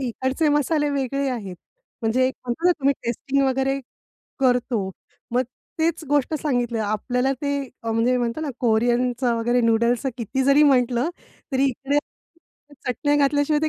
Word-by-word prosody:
इकडचे 260 +4 0
मसाले 295 +1 +2
वेगळे 275 0 -1
आहेत. 200 -8 -5 0.5
म्हणजे 240 +3 +2
एक 260 - -2
होतं 245 +9 -1
ना 360 - +6
तुम्ही 275 +1 +4
टेस्टिंग 270 +4 0
वगैरे 270 +1 +1 0.6
करतो. 245 -6 +1 0.4
मग 245 - +3 0.4
तेच 325 0 +1
गोष्ट 290 +1 +1
सांगितलं 245 -5 0
आपल्याला. 250 +5 0
ते 285 +2 -2 0.3
अ, 225 - -1
म्हणजे 235 +3 +2
म्हणतात 240 +5 -2
ना 295 - -2
कोरियनचं 240 +1 +2
वगैरे 240 +2 +1
नूडल्सच 235 +3 +2
किती 245 +3 -1
जरी 280 +3 +5
म्हटलं, 255 0 +3 0.4
तरी 265 +1 +2
इकडे 275 +3 -1 0.9
चटण्या 290 +4 +1
घातल्याशिवाय 290 +1 +2
255 Hz, 140 wpm, -23 LUFS, 240-280 Hz, 0.9 s, ना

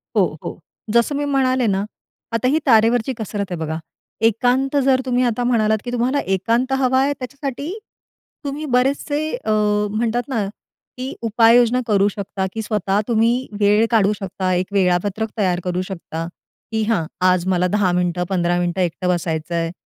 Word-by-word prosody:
हो, - - +2
हो. - - -6 0.3
जसं 235 +5 +2
मी 290 +1 -1
म्हणाले 260 -3 +1
ना, 195 -1 +1 0.5
आता 230 +2 +1
ही 305 +4 +3
तारेवरची 230 0 +4
कसरत 205 -2 -3
आहे. - - -1
बघा 160 0 -3 0.5
एकांत 250 +5 +1
जर 260 -1 +4
तुम्ही 250 0 +1
आता 245 0 0
म्हणालात 220 -3 +2
की 245 - -3
तुम्हाला 245 +3 +1 0.2
एकांत 235 +7 0
हवा 260 0 +3
आहे 280 +1 +2
त्याच्यासाठी 280 +3 -5 0.7
तुम्ही 285 +2 -4
बरेचसे 280 +3 +1 0.2
अ, 355 - -3 0.4
म्हणतात 235 +2 0
ना 225 -7 0 0.5
की 260 +2 -4
उपाययोजना 235 +2 +4
करू 200 -2 +3
शकता 195 -1 -4
की 225 - -3
स्वतः 210 -2 0
तुम्ही 235 +2 +2
वेळ 210 +2 +4
काढू 210 -3 +4
शकता, 185 -1 -2
एक 180 +1 0
वेळापत्रक 195 +3 +1
तयार 180 -4 +1
करू 180 0 -1
शकता, 170 -3 -5 0.4
की 220 - 0
हां, 210 -7 0 0.2
आज 185 -1 +3
मला 180 -1 +2
10 195 -1 +1
मिनिटं 180 0 0
15 175 -2 +1
मिनिटं 175 +1 -1
एकटं 180 +1 -1
बसायचं 170 -1 -1
आहे 165 0 -1
220 Hz, 165 wpm, -20 LUFS, 185-250 Hz, 0.7 s, तारेवरची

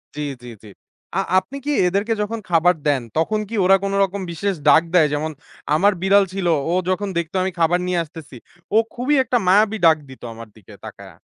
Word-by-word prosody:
জী, 150 - -4 0.2
জী, 120 - -10
জী। 105 - -12 0.5
আ - - +2 0.2
আপনি 250 +9 -10
কি 295 - -1 0.2
এদেরকে 200 +5 0
যখন 225 +2 -3
খাবার 175 +1 +3
দেন, 140 -3 +2 0.2
তখন 215 +7 0
কি 230 - -5
ওরা 195 +1 +6
কোন 195 - -2
রকম 195 +1 -3
বিশেষ 195 +4 -2
ডাক - - +7
দেয়? 160 -4 +5
যেমন 155 +2 -2 0.4
আমার 200 +5 +3
বিড়াল 195 +1 +4
ছিল 190 -2 -2 0.2
ও - - 0 0.2
যখন 195 +2 -1
দেখতো 170 +1 -3
আমি 190 - -2
খাবার 170 +2 +2
নিয়ে 180 -2 0
আসতেছি 155 -5 -12 0.4
ও - - +6 0.2
খুবই 255 +4 0
একটা 250 - 0
মায়াবী 210 +3 +3
ডাক 160 -1 +6
দিত 130 - -13
আমার 115 0 -11
দিকে 110 - -16
তাকাইয়া। - - -11
185 Hz, 200 wpm, -20 LUFS, 160-205 Hz, 0.5 s, ডাক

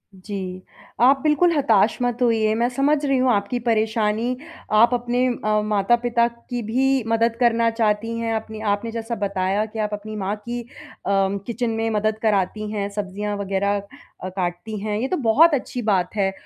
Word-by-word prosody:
जी, 185 -1 -6 0.4
आप 270 +3 +6
बिल्कुल 310 +4 +3
हताश 225 -6 +3
मत 245 0 -1
होइए 225 -3 +3
मैं 235 +2 +2
समझ 275 +4 +2
रही 275 -1 +2
हूँ 255 0 +3
आपकी 205 +3 0
परेशानी। 225 +1 0 0.4
आप 230 +3 +5
अपने 245 +1 0
अ, 215 -3 0
माता 210 +1 +2
पिता 235 -1 +2
की 240 +1 -6
भी 260 +4 +1
मदद 230 0 +2
करना 230 -1 +3
चाहती 225 0 0
हैं 230 -1 -1
अपने 220 0 -5
आपने 225 +3 -4
जैसा 230 +1 -4
बताया 195 +1 0
कि 220 0 -8
आप 210 -1 -1
अपनी 215 +1 -6
माँ 200 0 -2
की 235 +3 -5
अ, 235 - -14 0.4
किचन 200 +4 0
में 225 0 -1
मदद 215 0 0
कराती 210 0 0
हैं 205 -2 -2
सब्जियाँ 205 0 -4
वगैरह 200 0 0 0.5
अ, 185 - -3
काटती 185 +3 -4
हैं। 210 0 -2
ये 255 - -1
तो 365 - -1
बहुत 310 +9 +6
अच्छी 255 -2 -2
बात 180 0 0
है 195 -2 +1
220 Hz, 180 wpm, -22 LUFS, 205-240 Hz, 0.5 s, आप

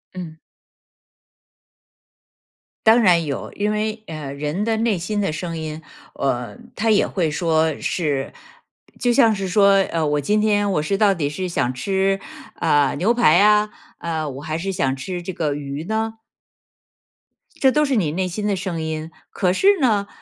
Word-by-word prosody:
嗯。 165 -3 -7 2.5
当 225 +2 +7
然 175 -5 +4
有， 140 -2 -4
因 210 +1 -1
为， 215 +1 -2
呃， 150 -4 -6
人 150 +8 -2
的 225 -1 +1
内 220 -4 +1
心 205 +5 -2
的 195 - 0
声 165 +1 -4
音， 155 0 -5 0.3
呃， 125 - -2 0.2
它 225 +1 0
也 205 - +3
会 165 -5 -1
说 160 -1 +1
是 145 -6 -2 0.7
就 245 -1 +2
像 230 -5 +5
是 195 -2 -3
说， 200 +1 +5
呃， 165 -2 0
我 150 0 +1
今 210 +8 +1
天 205 -1 +2
我 150 -6 +1
是 195 +6 -1
到 205 -2 +4
底 145 -5 -2
是 185 +5 -4
想 130 -7 -1
吃， 195 +7 0 0.4
呃， 145 -4 +2
牛 215 +9 +2
排 240 -7 +5
啊？ 210 +1 +4 0.3
呃， 160 -3 -3
我 135 +1 -8
还 155 +1 -3
是 195 +3 -4
想 135 -6 0
吃 175 +6 -5
这 185 - -4
个 155 -4 -1
鱼 145 +2 -5
呢？ 220 +1 -2 1.4
这 265 -1 +5
都 300 +1 +2
是 275 -2 0
你 165 -9 +1
内 185 +3 -1
心 205 +4 -3
的 200 - +1
声 180 -3 -4
音， 160 0 -4 0.2
可 180 -2 +1
是 395 - +4
呢， 210 -6 +2
180 Hz, 180 characters per minute, -21 LUFS, 155-210 Hz, 2.5 s, 当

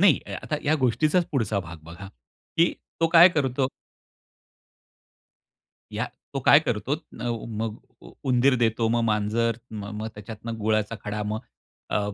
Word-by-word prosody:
नाही, 190 -6 +6
या - - -4
आता 150 - -2
या 155 +1 +3
गोष्टीचाच 150 +8 +3
पुढचा 110 -7 0
भाग 85 -1 -9
बघा, 85 +5 -10 0.5
की 170 +1 +4 0.3
तो 165 - +5
काय 170 +2 +9
करतो? 135 -5 0 2.2
या - - -1 0.3
तो - - -1
काय - - +7
करतो - - -1 0.3
नव 120 -2 -2 0.2
मग 110 -1 -2 0.5
उंदीर 130 +1 +4
देतो, 115 -1 +1
मग 120 +1 +2
मांजर 110 +2 +1
म 105 -2 -6 0.2
मग 110 - -3
त्याच्यातन 105 +2 -8
गुळाचा 110 +1 +1
खडा, 105 0 -3
मग 105 +1 -2 0.5
अ, - - +3
115 Hz, 145 wpm, -25 LUFS, 105-135 Hz, 2.2 s, काय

